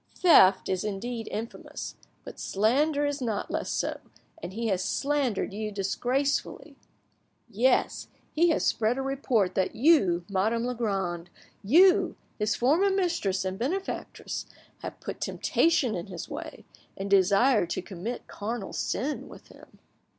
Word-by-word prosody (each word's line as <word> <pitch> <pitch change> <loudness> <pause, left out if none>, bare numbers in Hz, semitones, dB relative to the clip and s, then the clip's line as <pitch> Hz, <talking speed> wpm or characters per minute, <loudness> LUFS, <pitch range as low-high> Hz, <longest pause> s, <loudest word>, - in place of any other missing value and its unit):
Theft 195 - +6
is 185 -1 -1
indeed 225 +3 -4
infamous, 225 +2 -6 0.3
but - - -10
slander 285 +9 +1
is 290 -1 -2
not 225 -4 -2
less - - -2
so, - - -2 0.4
and 175 - -6
he 230 +4 -4
has 190 -2 0
slandered 275 -8 -1
you 215 +1 -4
disgracefully. 245 +8 -1 0.7
Yes, 245 +3 +1 0.3
he 340 +2 +4
has 320 - +1
spread 225 +3 +1
a 270 - -2
report 255 -8 0
that 190 0 0
you, 215 - +4
Madame 215 +4 0
Legrand, 195 -8 -2 0.3
you, 355 - +5 0.2
his 210 0 +1
former 315 +11 +3
mistress 340 - 0
and 190 +1 -3
benefactress, 370 +11 -4 0.3
have - - -7
put - - -7
temptation 310 -8 +1
in 175 +1 -4
his 180 -3 -7
way, - - -8 0.3
and 195 0 -4
desired 200 +2 +4
to - - -3
commit 200 +6 -6
carnal 215 0 -5
sin 290 +4 -2
with - - -14
him. - - -17
225 Hz, 135 wpm, -27 LUFS, 195-275 Hz, 0.7 s, Theft